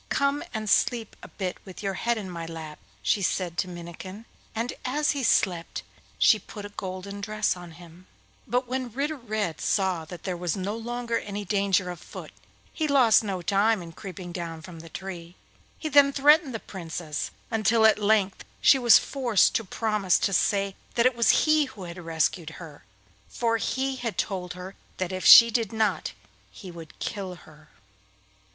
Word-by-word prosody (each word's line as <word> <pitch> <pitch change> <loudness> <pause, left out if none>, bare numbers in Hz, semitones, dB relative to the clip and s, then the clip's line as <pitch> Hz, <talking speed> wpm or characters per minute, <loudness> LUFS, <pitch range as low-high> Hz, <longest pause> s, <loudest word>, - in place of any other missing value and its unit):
'Come 280 +1 +1
and 215 0 -4
sleep 225 +1 +1
a - - -10
bit 185 -3 -4
with 190 +1 -10
your 195 -1 -1
head 235 +5 0
in 205 -3 -5
my 170 -2 -6
lap,' 160 -2 -8 0.2
she 205 - +2
said 180 -2 -1
to - - 0
Minnikin, 180 +4 -9 0.3
and 230 +3 -2
as 295 +4 +1
he 285 - -2
slept 180 -8 +1 0.3
she 215 - +5
put 205 -1 -9
a - - -7
golden 195 0 -6
dress 215 0 0
on 175 -2 -11
him. 175 +1 -15 0.4
But 250 +1 0
when 255 -1 -3
Ritter 285 +6 -2
Red 215 - -3
saw 190 -4 0
that 170 +1 -10
there 185 -2 -2
was 175 +1 -2
no 195 +3 -3
longer 235 0 -3
any 205 0 -6
danger 195 -2 +1
afoot, 175 -1 -10 0.4
he 315 - -1
lost 255 -7 +5
no 190 -4 -3
time 205 +1 +2
in 165 - -10
creeping 185 0 -8
down 165 -2 -6
from 170 -1 -10
the 165 +1 -11
tree. 175 -1 -8 0.4
He 315 - -4
then 285 -1 +6
threatened 290 -1 +4
the - - -3
Princess, 165 -6 -5 0.2
until 225 0 +3
at 220 -1 +5
length 205 -2 +1 0.2
she 270 - +6
was 240 -2 +8
forced 245 -7 +2
to 225 - 0
promise 210 -2 +1
to 195 - 0
say 195 +1 +1 0.2
that 235 - +3
it 255 -1 +4
was 235 -1 +4
he 310 -1 +4
who 260 -8 -10
had 175 0 -8
rescued 165 0 -1
her, 160 -4 -11 0.5
for 230 -1 0
he 265 +3 -2 0.2
told 180 -3 -2
her 180 +1 -8 0.2
that 185 0 -2
if 185 0 -4
she 235 0 +11
did 225 -3 0
not 220 -1 0 0.4
he 185 -4 -11
would 165 -2 -11
kill 190 -3 -4
her. 155 -3 -18
200 Hz, 180 wpm, -26 LUFS, 180-230 Hz, 0.5 s, she